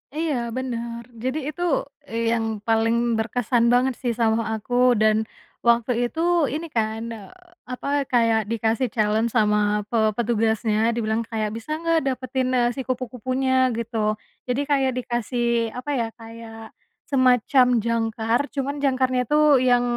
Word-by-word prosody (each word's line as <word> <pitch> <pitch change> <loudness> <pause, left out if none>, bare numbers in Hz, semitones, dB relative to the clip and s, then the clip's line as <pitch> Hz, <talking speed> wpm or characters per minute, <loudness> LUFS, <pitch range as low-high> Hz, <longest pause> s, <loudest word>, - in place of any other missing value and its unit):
Iya 315 -2 -1 0.2
bener 235 -2 -4 0.2
jadi 260 +4 -1
itu, 350 - -10 0.5
eee, 230 0 -1
yang 230 -1 0 0.2
paling 225 +1 +2 0.2
berkesan 235 +1 0
banget 255 +1 +3
sih 240 -2 0
sama 225 -1 +1
aku 220 +3 -7 0.3
dan, 215 0 +3 0.4
waktu 235 +1 +3 0.2
itu 325 +6 -5 0.3
ini 320 +3 -3
kan, 220 -1 -1
eee, 215 -4 -9 0.4
apa 250 +2 -6 0.2
kayak 230 -2 +3
dikasih 225 +2 0
challenge 220 +1 +1
sama 210 -1 +2
pe 235 - 0 0.2
petugasnya 220 -2 0 0.2
dibilang 220 0 0
kayak 220 -2 -2
bisa 230 - -11
nggak 330 -1 +2
dapetin, 255 0 -1
eee, 240 -1 +2
si 265 - -3
kupu-kupunya 255 +1 -2 0.2
gitu 230 0 -4 0.5
jadi 250 +3 0
kayak 270 -2 +2
dikasih 240 -1 -2 0.3
apa 250 +4 -6
ya 230 - 0
kayak, 225 -1 -11 0.4
semacam 255 0 +4 0.2
jangkar 225 0 0 0.2
cuman 280 +1 -2
jangkarnya 260 -1 +1
itu 300 - +1 0.3
yang 245 0 +4
235 Hz, 140 wpm, -23 LUFS, 225-255 Hz, 0.5 s, semacam